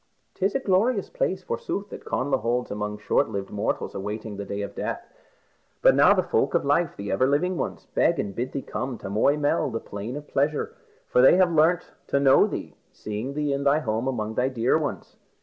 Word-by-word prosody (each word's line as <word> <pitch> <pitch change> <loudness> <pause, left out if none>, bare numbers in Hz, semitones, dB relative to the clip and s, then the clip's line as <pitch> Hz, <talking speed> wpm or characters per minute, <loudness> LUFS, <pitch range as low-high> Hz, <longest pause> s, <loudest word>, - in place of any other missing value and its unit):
"'Tis 195 +1 -1
a - - +3
glorious 205 0 +1
place, - - -1
forsooth, 470 - -4
that - - -9
Connla 135 0 0
holds 120 +2 -1
among 105 0 -3
short 105 - +1
lived 100 -2 -5
mortals 105 - -2
awaiting 105 +2 -5
the 100 0 -5
day 100 +1 -4
of 100 0 -6
death. - - -4 0.8
But - - +7
now - - +6
the - - +2
folk - - 0
of - - +1
life, 145 +3 +1
the 100 0 -4
ever 130 +7 +2
living 170 +7 +1
ones, - - -4
beg 170 - +3
and 100 -7 -3
bid 125 +5 -3
thee 140 - -3
come 130 -2 -4
to 95 - -7
Moy 140 +8 +3
Mell, 145 -1 +1
the 115 -2 -3
Plain 105 +5 -6
of 145 0 -7
Pleasure, 145 +2 0 0.3
for 125 - +3
they 130 - +7
have 185 -1 +4
learnt 165 +3 +3 0.2
to 140 - +1
know 135 -1 +5
thee, - - -6 0.2
seeing 110 +6 -5
thee 150 -1 0
in 140 0 -2
thy 140 +1 +4
home 115 -4 -1
among 110 -4 -2
thy 125 +3 +1
dear 125 -1 +1
ones." 155 -2 -3
135 Hz, 215 wpm, -25 LUFS, 110-155 Hz, 0.8 s, But